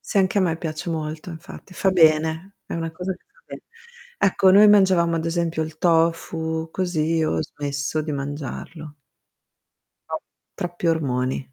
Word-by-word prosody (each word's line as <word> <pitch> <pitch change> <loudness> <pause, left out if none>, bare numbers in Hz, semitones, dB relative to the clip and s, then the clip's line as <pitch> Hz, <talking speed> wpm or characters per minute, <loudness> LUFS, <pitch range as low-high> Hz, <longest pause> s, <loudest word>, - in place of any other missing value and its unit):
Sì, - - -1
anche 190 +1 +2
a - - +4
me 170 -3 +1
piace 160 0 -5
molto 155 +1 -4
infatti, 165 +3 -11
fa 190 +2 +2
bene, 160 +1 +3
è - - -5
una 165 -1 -3
cosa 180 +3 -4
che 185 - -16
fa - - -29
be - - -9 0.6
Ecco, 195 -1 +4
noi 205 +3 +8
mangiavamo 185 -5 +4
ad 160 - -2
esempio 165 -1 -1
il 155 0 -7
tofu, 165 -1 +1
così, 165 -3 0
ho 80 - 0
smesso 145 +1 -3
di 150 0 -4
mangiarlo. 145 +2 -6 1.1
No. - - -3 0.3
Troppi 175 0 -4
ormoni. 130 -4 -1
165 Hz, 155 wpm, -23 LUFS, 155-180 Hz, 1.1 s, noi